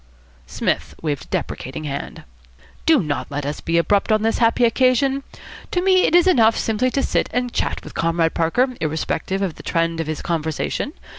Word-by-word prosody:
Psmith - - -2
waved 145 -4 -2
a - - -24
deprecating 130 +4 -4
hand. 140 -2 -5 0.6
"Do 310 - +5
not 145 -2 -3
let 145 -1 -4
us 145 +1 -4
be 165 0 0
abrupt 200 +5 +2
on 215 0 +3
this 225 - +1
happy 235 +1 +3
occasion. 260 +3 +2 0.5
To 360 - 0
me 370 0 +4
it - - +2
is 350 - +6
enough 230 -11 +4
simply 225 +3 0
to 275 +2 -1
sit - - 0
and 245 -1 -1
chat - - -2
with - - -10
Comrade 165 0 +1
Parker, 170 +11 +2
irrespective 160 +5 -2
of 180 -5 -3
the - - -9
trend 165 0 -1
of 165 - -2
his 155 -1 -4
conversation. 160 - -2
195 Hz, 190 wpm, -21 LUFS, 160-250 Hz, 0.6 s, is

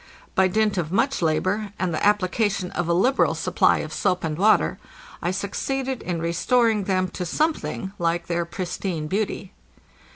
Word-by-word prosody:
By 190 0 +4
dint 210 0 +1
of 160 -2 -3
much 265 +6 +1
labor, 185 +6 0
and 185 -2 -1
the - - -2
application 205 -1 +1
of 175 -1 -2
a 170 - +2
liberal 255 +10 +3
supply - - +2
of - - -8
soap 180 -1 0
and 160 -2 -1
water, 205 +6 +3 0.4
I 175 - 0
succeeded 255 +7 -2
in 175 -2 -3
restoring 210 +6 +2
them 185 -1 +1
to 180 - -5
some 310 - +1
thing 195 -9 -6
Jike 170 0 0
their 170 0 -1
pristine 175 -1 -4
beauty. 195 +2 -2
185 Hz, 165 wpm, -24 LUFS, 175-215 Hz, 0.4 s, By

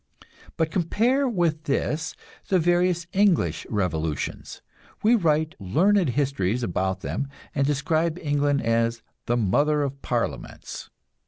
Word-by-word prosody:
But 160 -1 0
compare 235 - +1
with 170 -7 0
this 150 +3 -1 0.3
the 190 - +3
various 175 0 +2
English 195 -3 +2
revolutions. 80 - -3 0.4
We 220 +3 +5
write 160 -7 +2
learned 175 - +2
histories 125 -4 0
about 95 -1 -1
them, 140 - -3 0.3
and 140 0 +1
describe 155 +3 0
England 145 -3 0
as 115 0 +1 0.2
"the 120 - +2
Mother 145 +8 +2
of 140 0 -4
Parliaments." 120 -2 -4
150 Hz, 115 wpm, -25 LUFS, 120-175 Hz, 0.4 s, We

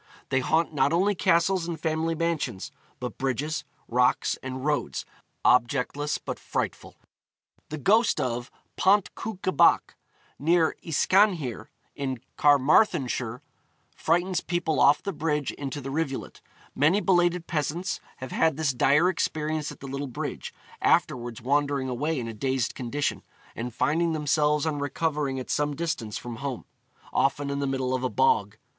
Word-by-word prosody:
They 130 - +2
haunt 160 +5 +1
not 140 0 +2
only 190 +5 +3
castles 180 -1 +2
and 170 -2 -4
family 160 +1 -1
mansions, 155 - -2 0.3
but 125 - -6
bridges, 140 +4 -1 0.2
rocks, 125 +1 +2
and 130 +1 -5
roads, 150 -1 -1 0.4
objectless 130 +4 +2
but - - -6
frightful. - - -4 0.7
The 155 - -4
ghost 215 - +3
of 120 -2 -2 0.3
Pont 200 +1 +3
Cwnca 195 -5 -4
Bach, - - +4 0.4
near 165 +2 +3
Yscanhir, 165 - +2 0.3
in 135 -3 -3 0.2
Carmarthenshire, 140 - +3 0.5
frightens 175 +3 +1
people 165 -4 -1
off 140 +1 +5
the 200 - -3
bridge 150 -3 -1
into 140 0 -5
the 135 0 -6
rivulet. 140 -2 -3 0.3
Many 155 +8 +3
belated 175 -3 +2
peasants 165 +3 -2 0.2
have 130 -1 -7
had 160 -3 +2
this 155 -4 +1
dire 145 +7 +4
experience 155 -3 -1
at - - -13
the 135 - -7
little 140 +1 -4
bridge, 125 - -5 0.3
afterwards 120 -2 +1
wandering 140 0 +1
away 145 +5 -1
in 115 - -4
a 115 - -5
dazed 130 +2 -1
condition, 140 +3 -2 0.3
and 120 +2 -4
finding 165 +7 +1
themselves 150 0 +1
on 150 -2 -1
recovering 145 -1 -1
at 130 - -5
some 145 0 0
distance 135 -10 -3
from 120 -2 -7
home, 135 -2 -5 0.5
often 140 +1 +1
in 140 - -2
the 140 - -1
middle 130 -1 -1
of 130 0 -1
a 130 - +1
bog. 460 -1 +2
145 Hz, 145 wpm, -26 LUFS, 130-165 Hz, 0.7 s, off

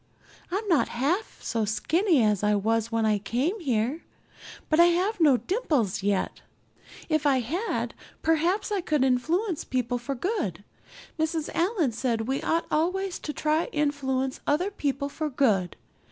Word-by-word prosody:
I'm 400 +4 -2
not 335 -7 +3
half 305 - -1
so 230 -2 -1
skinny 300 - +2
as 210 -3 +2
I 210 0 +3
was 225 +2 0
when 225 -1 +1
I 210 -1 +2
came 255 - -1
here, 260 - -1 0.6
but 310 - +2
I 340 - +9
have 370 +5 +1
no 295 -6 +5
dimples 250 - 0
yet. 200 -1 -1 0.7
If 310 -2 +1
I 265 -2 +3
had 340 - -2 0.3
perhaps 335 +7 +1
I 405 -2 0
could 300 -5 +1
influence 320 - +1
people 245 -1 -1
for 275 +3 -4
good. 265 - -2 0.6
Mrs. 315 0 -1
Allan 340 - +1
said 230 0 -1
we 265 +5 -2
ought 330 +1 0
always 365 +4 0
to 300 - -4
try 310 +2 0
to - - -14
influence 270 -3 0
other 350 +8 +1
people 280 -6 -2
for 300 +2 -3
good. 215 -10 +1
290 Hz, 155 wpm, -27 LUFS, 235-340 Hz, 0.7 s, I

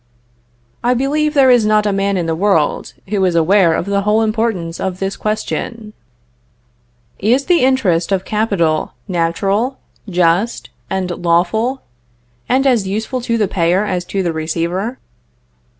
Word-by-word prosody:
I 245 +1 +2
believe 300 +4 0
there 265 -2 +6
is 245 -2 +5
not 215 0 +2
a 205 - +1
man 195 0 0
in 175 - -1
the 165 - -1
world, 170 -4 0
who 200 -2 0
is 180 -2 +1
aware 170 0 +4
of - - -2
the 200 0 0
whole 210 +2 +2
importance 215 -7 -1
of 190 -1 -3
this 195 +1 -3
question: 215 +1 -4 1.3
"Is 245 +7 +2
the 350 -1 +3
interest 205 -10 +2
of 190 -1 0
capital 200 -8 0
natural, 195 +8 0 0.3
just, 180 +5 0 0.2
and 190 -2 -2
lawful, 185 +10 +1 0.7
and 265 +2 +2
as 235 -7 +2
useful 220 +6 -3
to 230 -1 -1
the 210 -3 +1
payer 180 +3 +1
as 185 -3 -2
to 195 +1 -2
the 170 -2 -1
receiver?" 170 +8 -2
200 Hz, 150 wpm, -17 LUFS, 175-230 Hz, 1.3 s, there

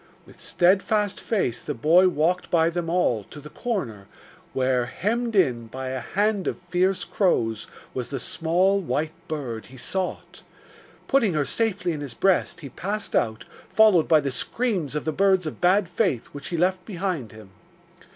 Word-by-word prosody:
With - - -17
steadfast 200 +3 +2
face 190 - -1
the - - -4
boy 165 +9 +5
walked 180 +1 0
by 165 -1 +3
them 170 -1 -3
all, 145 - +1
to 150 - -11
the 150 +1 -11
corner, 120 - -4 0.4
where, 130 -2 +1
hemmed 230 - -2
in 125 - +2
by 130 +3 -6
a 130 0 -3
hand 205 - 0
of - - -1
fierce 185 +1 0
crows, 115 - 0 0.3
was 125 -2 -4
the 135 - -3
small 180 +9 +1
white 155 -3 -1 0.2
bird 130 -8 -5
he 130 - -13
sought. 185 +8 -4 0.7
Putting 230 - +2
her 150 -2 +1
safely 205 -4 -1
in 150 -3 -4
his 135 -5 -6
breast, 190 +4 +1
he 140 - -7
passed 200 - -4
out, 110 0 0 0.3
followed 215 -7 +5
by 155 -2 +5
the 140 -1 -2
screams 185 - -1
of 150 - -2
the 160 - 0
birds 190 +1 +2
of 155 - -6
Bad 185 +2 +4
Faith 175 - -1
which 145 0 -7
he 170 - -3
left 185 +2 +1
behind 180 - -3
him. 110 -3 -14
170 Hz, 170 wpm, -24 LUFS, 130-195 Hz, 0.7 s, boy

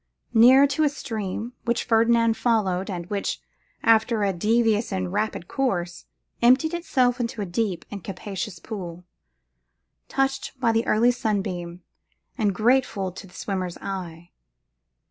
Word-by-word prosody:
Near 250 +4 +7
it 280 +1 +1
a 305 -1 +4
stream, 225 -4 -5
which 235 -1 0
Ferdinand 230 0 +3
followed, 210 -5 0
and 175 -3 -4
which, 200 -1 -2 0.4
after 225 -1 +3
a 195 -1 +1
devious 220 +4 +1
and 185 -1 -2
rapid 210 -4 -2
course, 175 -10 -2 0.4
emptied 255 +7 +4
itself 260 -8 +1
into 235 -1 -3
a 205 - -1
deep 185 0 -2
and 200 -4 -7
capacious 195 0 -5
pool, 180 -3 -7 1.0
touched 270 -1 -1
by 235 -3 +3
the 225 0 0
early 235 +3 +4
sunbeam, 190 -7 -3 0.5
and 205 -5 0
grateful 220 -4 +1
to 190 +2 -10
the 180 - -18
swimmer's 185 -3 -3
eye. 175 -3 -7
215 Hz, 135 wpm, -24 LUFS, 185-240 Hz, 1.0 s, Near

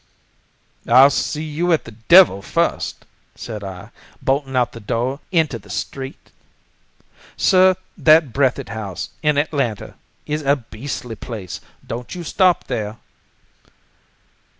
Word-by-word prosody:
"'I'll 130 +4 +7
see 150 +2 -2
you 160 +3 -1
at 160 - 0
the 115 - -9
devil 115 - +6
first!' - - -1 0.3
said 110 -3 -7
I, 95 -2 -8 0.3
bolting 135 0 -1
out 125 -1 +2
of - - -26
the 115 - -9
door 120 +6 -2
into 160 -9 +1
the - - -18
street. 135 -1 -6 1.1
"Sir, 185 -1 +5 0.2
that 155 -5 +5
Breathitt 135 -6 +1
House, 105 -4 -5
in 150 -2 +2
Atlanta, 140 - -1 0.3
is 150 +1 -2
a 140 0 +3
beastly 125 -1 -7
place! 105 -5 -7 0.2
Don't 120 +8 -6
you 175 - -6
stop 180 +2 +2
there." 110 -3 -4
135 Hz, 125 wpm, -20 LUFS, 115-150 Hz, 1.1 s, I'll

